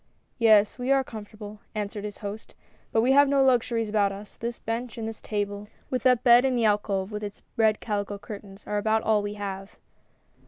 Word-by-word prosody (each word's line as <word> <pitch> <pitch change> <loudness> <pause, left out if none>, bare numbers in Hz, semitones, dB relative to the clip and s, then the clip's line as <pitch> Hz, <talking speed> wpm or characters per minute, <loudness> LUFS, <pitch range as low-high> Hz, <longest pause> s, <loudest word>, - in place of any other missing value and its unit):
" - - -44
Yes, 210 +2 +5
we 250 +2 -1
are 270 -1 +4
comfortable," 210 -2 -9 0.2
answered 210 0 -4
his 205 -1 -6
host, 205 +2 -7 0.2
" - - -35
but 225 - +3
we 250 +3 +3
have 280 +1 +6
no 275 -1 +4
luxuries 235 -3 +2
about 205 -2 +2
us. 200 +1 -10
This 235 +1 -5
bench 230 +1 -4
and 225 -1 -4
this 225 0 -7
table, 205 -1 -3 0.2
with 255 -2 0
that 250 -1 +3
bed 240 0 +7
in 265 -1 +1
the 235 -2 +2
alcove 205 -2 0
with 210 0 -5
its 205 -1 -7
red 220 -1 +3
calico 205 -2 -3
curtains, 200 -1 -10
are 210 0 -1
about 220 +1 +1
all 215 -1 +3
we 205 0 -4
have." 195 -1 -6
215 Hz, 210 wpm, -26 LUFS, 205-235 Hz, 0.2 s, bed